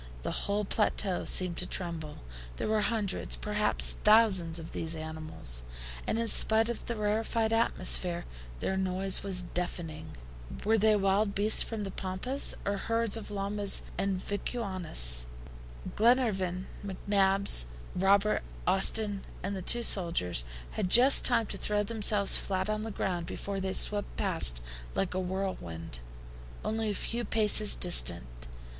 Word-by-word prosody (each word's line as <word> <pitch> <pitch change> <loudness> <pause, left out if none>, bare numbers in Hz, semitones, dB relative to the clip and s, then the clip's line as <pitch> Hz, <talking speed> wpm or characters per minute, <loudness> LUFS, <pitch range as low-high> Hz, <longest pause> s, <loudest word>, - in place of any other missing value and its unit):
The - - -3 0.2
whole 205 +1 0
plateau 200 -2 -1
seemed 180 -2 +2
to 180 - -1
tremble. 165 - -4 0.3
There - - -3
were 215 0 +1
hundreds, 210 -3 -1
perhaps 210 0 0
thousands, 200 -7 +4
of 165 -1 -8
these 165 0 -5
animals, 155 - 0 0.5
and - - -1
in 230 0 -1
spite 220 +1 +4
of 235 - -6
the 235 - -3
rarefied 220 +1 -1
atmosphere, 185 -6 +1 0.4
their 190 - -1
noise 190 0 0
was 185 -2 +1
deafening. 170 - -6 0.5
Were 220 +1 +3
they 215 +1 +4
wild 200 +1 0
beasts 210 +2 +5
from 220 -2 -3
the 195 - -5
Pampas, 190 +10 -1
or 200 0 -1
herds 230 +1 0
of 220 -2 -6
llamas 200 0 0
and 195 -1 -1
vicunas? 185 - +1 0.7
Glenarvan, 205 -6 +1 0.2
McNabbs, 195 - +1 0.3
Robert, 200 +3 +2 0.2
Austin, 200 +2 +2 0.2
and 200 +2 -3
the 190 - -5
two 235 +6 0
sailors, 165 - 0 0.3
had 180 - -3
just 255 +7 +6
time 235 -2 +2
to - - -7
throw 210 0 -1
themselves 210 -2 +4
flat 190 +1 -2
on 215 0 -3
the 225 - -5
ground 180 -4 -3
before 200 -1 -5
they 190 0 -3
swept 205 +1 +1
past 165 - 0 0.3
like 195 - -1
a 185 - -2
whirlwind, 180 - -5 0.7
only 220 0 -1
a - - -1
few 235 +4 -3
paces 215 -2 +4
distant. - - -2
195 Hz, 140 wpm, -29 LUFS, 180-215 Hz, 0.7 s, just